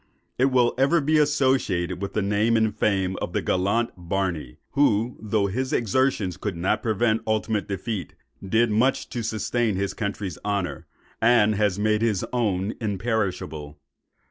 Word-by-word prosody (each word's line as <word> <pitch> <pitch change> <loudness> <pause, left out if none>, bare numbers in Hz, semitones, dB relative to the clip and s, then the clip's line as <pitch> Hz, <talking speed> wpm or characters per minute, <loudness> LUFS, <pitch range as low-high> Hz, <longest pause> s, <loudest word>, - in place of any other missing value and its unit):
It 130 - +5
will 125 -3 +3
ever 140 +6 +4
be 155 +1 +2
associated 130 -12 +1
with 100 - -4
the 110 - 0
name 105 +3 +2
and 110 -2 +1
fame 95 -3 0
of - - -4
the - - 0
gallant 100 +6 +1
Barney, 90 -7 -3
who, 120 -4 +2
though 110 -1 0
his 130 +7 -2
exertions 110 -5 +1
could 95 -2 -4
not 90 +3 0
prevent 110 0 +1
ultimate 110 -1 0
defeat, 100 -2 -4 0.3
did 110 +4 +2
much 120 +6 +1
to 120 - -4
sustain 110 0 -1
his 100 +1 -1
country's 100 -5 -4
honour, 100 -3 -2 0.3
and 115 -2 +5
has 105 -2 +1
made 105 +1 +1
his 110 -5 +1
own 105 -4 0
imperishable. 95 -9 -2
105 Hz, 150 wpm, -24 LUFS, 95-120 Hz, 0.3 s, It